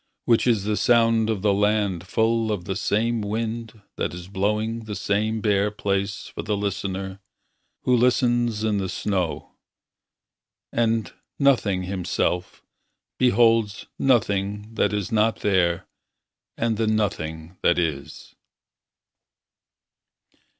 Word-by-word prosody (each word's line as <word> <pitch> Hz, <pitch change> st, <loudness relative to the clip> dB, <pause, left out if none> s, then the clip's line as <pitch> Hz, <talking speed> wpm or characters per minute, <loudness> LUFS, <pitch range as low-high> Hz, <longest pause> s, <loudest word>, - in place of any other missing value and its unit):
Which 115 Hz, +1 st, +3 dB
is 110 Hz, -5 st, +3 dB
the 105 Hz, 0 st, 0 dB
sound 115 Hz, -2 st, +3 dB
of 105 Hz, -3 st, -1 dB
the 105 Hz, -2 st, +4 dB
land 100 Hz, -3 st, +1 dB
Full 115 Hz, +1 st, +1 dB
of 100 Hz, -5 st, -3 dB
the 95 Hz, -1 st, -3 dB
same 110 Hz, +3 st, 0 dB
wind 110 Hz, +1 st, -4 dB
That 80 Hz, -, -2 dB
is 90 Hz, 0 st, -8 dB
blowing 105 Hz, +4 st, -1 dB
the 105 Hz, -1 st, -5 dB
same 110 Hz, +3 st, 0 dB
bare 105 Hz, -1 st, +2 dB
place 100 Hz, -1 st, -2 dB
For -, -, -6 dB
the 105 Hz, -1 st, -1 dB
listener, 95 Hz, -1 st, -3 dB, 0.6 s
who 125 Hz, -, +3 dB
listens 120 Hz, -2 st, +2 dB
in 105 Hz, -2 st, +1 dB
the 95 Hz, -1 st, -2 dB
snow. 90 Hz, -3 st, -2 dB, 1.2 s
And, 115 Hz, -4 st, 0 dB, 0.2 s
nothing 110 Hz, -9 st, +2 dB
himself, 90 Hz, -1 st, -2 dB, 0.6 s
beholds 115 Hz, -4 st, +3 dB
Nothing 105 Hz, -4 st, +1 dB
that 110 Hz, -, +1 dB
is 105 Hz, -3 st, -2 dB
not 110 Hz, 0 st, +2 dB
there 90 Hz, -4 st, +1 dB, 0.7 s
and 115 Hz, -2 st, 0 dB
the 110 Hz, 0 st, 0 dB
nothing 85 Hz, -6 st, -2 dB
that 85 Hz, -, +3 dB
is. 80 Hz, -5 st, -3 dB
105 Hz, 120 wpm, -24 LUFS, 95-115 Hz, 1.2 s, the